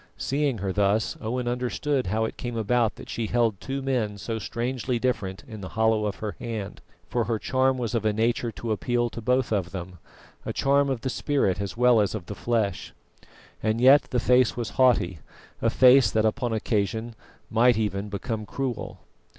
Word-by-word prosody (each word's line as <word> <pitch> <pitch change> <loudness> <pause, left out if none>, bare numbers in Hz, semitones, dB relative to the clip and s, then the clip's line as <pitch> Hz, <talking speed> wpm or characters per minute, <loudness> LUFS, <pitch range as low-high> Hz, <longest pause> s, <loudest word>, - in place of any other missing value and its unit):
Seeing 140 0 0
her 95 -1 -2
thus, 105 +2 +1
Owen 120 +3 -2
understood 125 +1 -1
how 110 +4 0
it - - -5
came 120 -1 -5
about 115 +1 +1
that - - -11
she 115 -2 -3
held 115 -4 +1
two 135 0 -4
men 120 -6 -1
so 110 +2 -4
strangely 120 +3 -2
different 110 -6 -2
in 110 -4 -9
the 95 - -6
hollow 110 -1 +3
of 100 - -3
her 105 -4 -5
hand, 110 -4 -5 0.3
for 120 -2 0
her 115 0 0
charm 130 +3 +1
was 120 -2 -3
of 115 -3 0
a 110 - +2
nature 115 +2 0
to 115 +1 -4
appeal 120 +2 0
to 115 - -7
both 125 +2 +1
of 95 -5 0
them 90 -2 -7 0.4
a - - -4
charm 140 0 +2
of 130 -4 -2
the 130 - -2
spirit 100 -12 0
as 100 +2 -5
well 125 -2 +5
as 100 +1 0
of 100 -5 -6
the 105 - -6
flesh. 105 -4 -2 0.7
And 110 +1 0
yet 135 +4 +7
the 125 - +1
face 125 0 +3
was 120 -3 -3
haughty, 115 - +2 0.4
a - - +3
face 130 0 +6
that 110 0 +1
upon 120 +2 0
occasion 110 +1 -1 0.4
might 120 +1 +4
even 105 -1 -2
become 105 +1 -4
cruel. 130 -5 -4
115 Hz, 190 wpm, -26 LUFS, 105-125 Hz, 0.7 s, yet